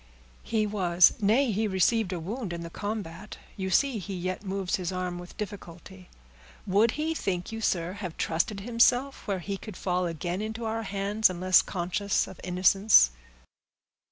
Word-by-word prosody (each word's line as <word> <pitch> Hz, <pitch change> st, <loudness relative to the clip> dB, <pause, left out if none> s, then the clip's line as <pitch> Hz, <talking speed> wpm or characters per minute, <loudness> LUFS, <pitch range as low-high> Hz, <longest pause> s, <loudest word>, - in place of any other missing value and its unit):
"He 220 Hz, -2 st, 0 dB
was; 180 Hz, -4 st, +4 dB
nay, 230 Hz, +5 st, +3 dB
he 215 Hz, +2 st, 0 dB
received 195 Hz, +1 st, +2 dB
a 180 Hz, -, -3 dB
wound 200 Hz, +3 st, -5 dB
in 170 Hz, -, -5 dB
the 170 Hz, 0 st, -7 dB
combat. 205 Hz, -2 st, -5 dB, 0.2 s
You 190 Hz, -2 st, -3 dB
see 260 Hz, +3 st, +2 dB
he 195 Hz, 0 st, -6 dB
yet 185 Hz, +2 st, -4 dB
moves 195 Hz, -2 st, -2 dB
his 180 Hz, -2 st, -3 dB
arm 180 Hz, -1 st, -3 dB
with 175 Hz, 0 st, -11 dB
difficulty. 185 Hz, -2 st, -8 dB, 0.6 s
Would 210 Hz, +4 st, +3 dB
he, 315 Hz, +2 st, -1 dB
think 180 Hz, -, -3 dB
you, 225 Hz, 0 st, -5 dB
sir, 175 Hz, -4 st, 0 dB
have 190 Hz, -5 st, -7 dB
trusted 185 Hz, +5 st, -1 dB
himself 245 Hz, +5 st, +2 dB
where 200 Hz, -2 st, 0 dB
he 195 Hz, +2 st, -4 dB
could 210 Hz, -1 st, -9 dB
fall 180 Hz, -1 st, 0 dB
again 175 Hz, +3 st, -3 dB
into 220 Hz, +2 st, -4 dB
our 225 Hz, 0 st, -2 dB
hands, 205 Hz, +1 st, +1 dB
unless 185 Hz, +1 st, +4 dB
conscious 190 Hz, +2 st, -1 dB
of -, -, -11 dB
innocence?" 185 Hz, -, +5 dB
195 Hz, 165 wpm, -28 LUFS, 180-215 Hz, 0.6 s, innocence